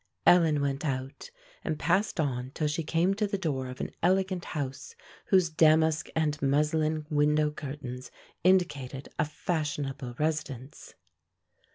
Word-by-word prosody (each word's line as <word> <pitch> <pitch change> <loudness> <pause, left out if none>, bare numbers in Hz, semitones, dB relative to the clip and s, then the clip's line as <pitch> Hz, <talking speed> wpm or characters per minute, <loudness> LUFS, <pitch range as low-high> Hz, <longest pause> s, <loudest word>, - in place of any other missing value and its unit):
Ellen 165 -4 +5
went 140 0 -1
out, 135 - -4 0.3
and 155 - -2
passed 185 +5 +1
on 130 -4 -1
till 155 - -1
she 150 +2 -1
came 165 +4 +1
to 210 +1 0
the 200 0 -2
door 140 -8 -2
of 125 0 -8
an - - -4
elegant 185 0 +1
house, 140 - -5 0.3
whose 185 -5 +4
damask 160 0 +4
and 150 -2 0
muslin 155 +2 +1
window 150 0 +3
curtains 135 -4 -7 0.3
indicated 145 -8 +1
a 150 - +3
fashionable 145 -5 -3
residence. 150 -4 -3
150 Hz, 135 wpm, -29 LUFS, 140-165 Hz, 0.3 s, Ellen